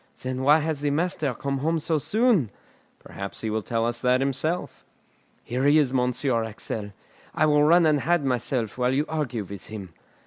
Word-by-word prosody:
"Then 130 0 -4
why 145 +3 +6
has 155 -2 -2
the 145 - +1
master 155 -1 0
come 140 +2 -3
home 160 +4 0
so 160 0 0
soon?" 215 - +2 0.5
"Perhaps 100 0 -8
he 110 - -2
will 110 0 -1
tell 115 +3 -1
us 120 0 -1
that 125 0 +3
himself." 140 +6 -2 0.6
"Here 125 +3 -2
he 145 +2 +5
is, 140 -4 +2
Monsieur 125 -1 +1
Axel; 105 -1 -6 0.4
I 155 - +3
will 150 -1 +4
run 170 +3 +5
and 150 -2 +3
hide 170 0 +1
myself 125 -3 -1
while 125 +1 +2
you 145 +2 +1
argue 135 -8 -2
with 100 0 -9
him." 100 -6 -8
135 Hz, 185 wpm, -25 LUFS, 115-155 Hz, 0.6 s, why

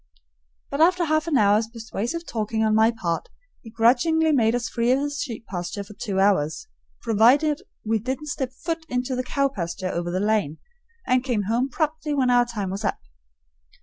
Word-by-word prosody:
But 280 +2 -1
after 350 +1 +4
half 310 0 +1
an 305 -5 +2
hour's 210 +1 +3
persuasive 230 +7 -5
talking 220 -3 -2
on 215 -1 +2
my 220 +1 +5
part, 175 -8 -3 0.3
he 225 - -11
grudgingly 260 +8 +3
made 230 -5 +3
us 245 -1 -2
free 235 +1 0
of 260 - +3
his 290 0 -3
sheep 230 -4 -5
pasture 180 +2 -5
for 205 +2 -13
two 205 -4 -3
hours, 195 - +1 0.4
provided 260 - +4 0.2
we 220 0 +1
didn't 260 +6 -4
step 265 -3 -3
foot 325 +4 -4
into 250 +1 -1
the 250 - -1
cow 275 +2 +1
pasture 185 -6 -4
over 175 0 -3
the 180 +2 -1
lane, 205 -7 0 0.5
and 255 0 +2
came 240 -6 0
home 235 +6 0
promptly 305 +1 -2
when 255 -3 +2
our 245 0 +5
time 210 -6 -4
was 200 +3 -5
up. 200 - 0
235 Hz, 185 wpm, -24 LUFS, 210-280 Hz, 0.5 s, my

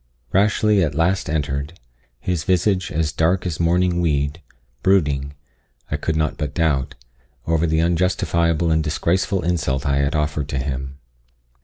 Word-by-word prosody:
Rashleigh 105 +1 +3
at 75 -3 -1
last 85 +2 +1
entered, 75 +1 -2 0.4
his 85 +2 -2
visage 95 +1 +1
as 80 -1 0
dark 85 +5 +1
as 85 -4 -3
mourning 85 +1 +2
weed 75 -1 0 0.4
brooding, 70 -7 +1 0.6
I - - 0
could 80 - -2
not 80 -2 0
but 75 -2 -4
doubt, 70 -4 0 0.5
over 80 +1 +1
the 80 0 +2
unjustifiable 85 -1 +1
and 80 0 +2
disgraceful 85 +4 0
insult 75 -5 -1
I 70 -1 +1
had 70 +2 +1
offered 75 -1 -1
to 70 - -2
him. 65 0 -4
80 Hz, 145 wpm, -21 LUFS, 70-90 Hz, 0.6 s, Rashleigh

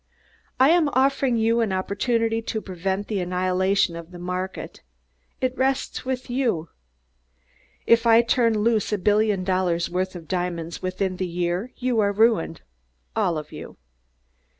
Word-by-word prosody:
I 265 +4 +6
am 335 -4 +4
offering 265 -2 +2
you 230 +1 +2
an 220 -4 0
opportunity 225 +4 0
to 225 -1 -3
prevent 190 +1 -3
the 210 -3 -2
annihilation 185 0 +1
of 170 0 -8
the 180 - -11
market. 180 +1 -5 0.6
It 255 0 0
rests 265 +1 -1
with 255 -1 -3
you. 235 - -1 1.2
If 230 0 +4
I 230 +1 +6
turn 230 -2 +2
loose 220 -1 +1
a 210 - +1
billion 205 0 +2
dollars' 180 -2 0
worth 185 +1 -2
of 165 -3 -9
diamonds 175 -2 -3
within 185 0 -2
the 185 - -2
year 175 +6 -2
you 245 -2 0
are 200 -1 +3
ruined 210 -6 +2 0.5
all 185 -7 +1
of 150 -1 -7
you. - - -9
200 Hz, 150 wpm, -24 LUFS, 180-230 Hz, 1.2 s, I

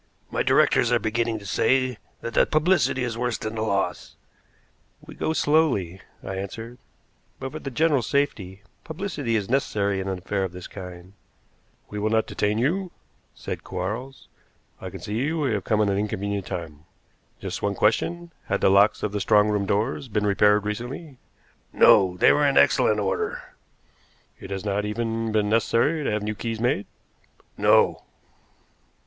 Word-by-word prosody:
"My - - 0
directors 120 - +3
are 120 - +5
beginning 115 0 -1
to 105 - -11
say 130 +4 +1 0.2
that 115 - -5
the - - +4
publicity 155 -4 +2
is 115 -2 -3
worse 125 -2 -1
than 110 0 -5
the 110 - -3
loss." 100 -3 -2 0.8
"We - - -13
go - - -2
slowly," 145 - +1 0.2
I 95 0 -5
answered; 115 +5 -7 0.6
"but 135 - -5
for 155 - -6
the 140 - -5
general 150 0 +2
safety 105 -7 -2 0.2
publicity 155 - -3
is 105 -3 -1
necessary 100 -6 0
in 95 - -4
an 95 -1 -2
affair 95 +2 -2
of 95 -2 -4
this 90 -1 -9
kind." 90 -1 -10 0.8
"We 105 - -4
will 105 +1 0
not 110 0 +2
detain 105 +1 -1
you," 175 +10 0 0.5
said - - -6
Quarles. 110 +9 -5 0.5
"I - - -5
can - - -10
see 120 +9 -2
we 150 -6 0
have 100 -3 -2
come 110 -1 +2
at 100 - +1
an 100 - 0
inconvenient 100 -2 -3
time. 80 -3 -6 0.5
Just - - -5
one 100 0 -1
question. 170 - 0
Had - - -1
the - - +4
locks 100 +2 +4
of 105 - -1
the 105 0 -2
strong 105 +1 +4
room 105 -2 0
doors 115 +7 -1
been 105 -2 -1
repaired 105 +1 +3
recently?" 125 +6 -5 0.5
"No. 90 -2 +5
They - - +6
were 145 0 +3
in 140 - +1
excellent 110 -5 +4
order." 95 -2 -2 1.0
"It - - -10
has 95 0 -5
not 100 0 0
even 115 +1 -2
been 105 -1 +1
necessary 115 +8 +2
to - - -1
have 105 -1 -1
new 105 +1 -2
keys 115 +1 -4
made?" 120 -3 0 0.7
"No." - - +3
110 Hz, 170 wpm, -24 LUFS, 100-130 Hz, 1.0 s, They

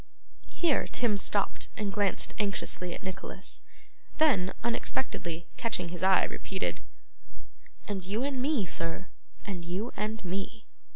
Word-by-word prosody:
Here, 330 -6 +3
Tim 235 -4 +2
stopped 200 0 +2
and 205 -2 -1
glanced 205 -2 +3
anxiously 190 -3 0
at - - -8
Nicholas; 190 0 -5 0.6
then 225 -13 +5
unexpectedly 175 -7 -1
catching 180 -7 0
his 175 0 -5
eye 190 0 +6
repeated, 190 -1 -1 1.1
'And 195 -3 -2
you 205 +7 0
and 270 -2 0
me, 270 -6 +2
sir, 165 +2 -3 0.4
and 185 -3 -3
you 185 +8 -2
and 215 -1 -2
me. 195 +5 -3
200 Hz, 125 wpm, -31 LUFS, 180-225 Hz, 1.1 s, eye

